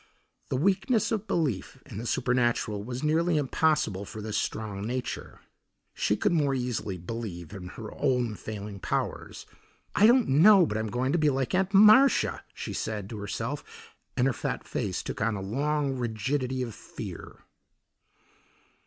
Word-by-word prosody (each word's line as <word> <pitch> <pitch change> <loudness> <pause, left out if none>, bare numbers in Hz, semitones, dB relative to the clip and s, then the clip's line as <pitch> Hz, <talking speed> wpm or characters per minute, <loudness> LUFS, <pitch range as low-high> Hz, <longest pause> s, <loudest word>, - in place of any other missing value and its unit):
The 130 - 0
weakness 200 - +2
of 220 -1 -1
belief 135 - -1
in 100 - -8
the 120 - -5
supernatural 120 -5 +1
was 125 +4 -5
nearly 160 +2 +2
impossible 145 -8 +1
for 100 +2 -8
this 105 0 -4
strong 105 -2 -2
nature. 120 +4 -4 0.5
She 105 - 0
could - - +1
more 145 -5 +2
easily 120 -6 -2
believe 90 -2 -6
in 95 -3 -7
her 110 +3 -8
own 125 -4 +1
failing 105 -1 -7
powers. - - -3 0.5
"I 210 - +6
don't 245 0 +5
know 180 +7 +7
but 110 -6 -2
I'm 110 0 -2
going 125 +4 0
to 175 - +2
be 150 -1 +4
like 135 -2 -1
Aunt 190 +1 +2
Marcia," 215 +7 +6
she - - -5
said 105 -2 -4
to 110 - -5
herself, 115 +7 -6 0.2
and 125 - +3
her 135 - +2
fat - - -4
face - - -2
took - - -5
on 110 0 +1
a - - -4
long 140 +7 -1
rigidity 130 +2 -1
of 115 -3 -5
fear. - - -9
125 Hz, 160 wpm, -28 LUFS, 105-150 Hz, 0.5 s, know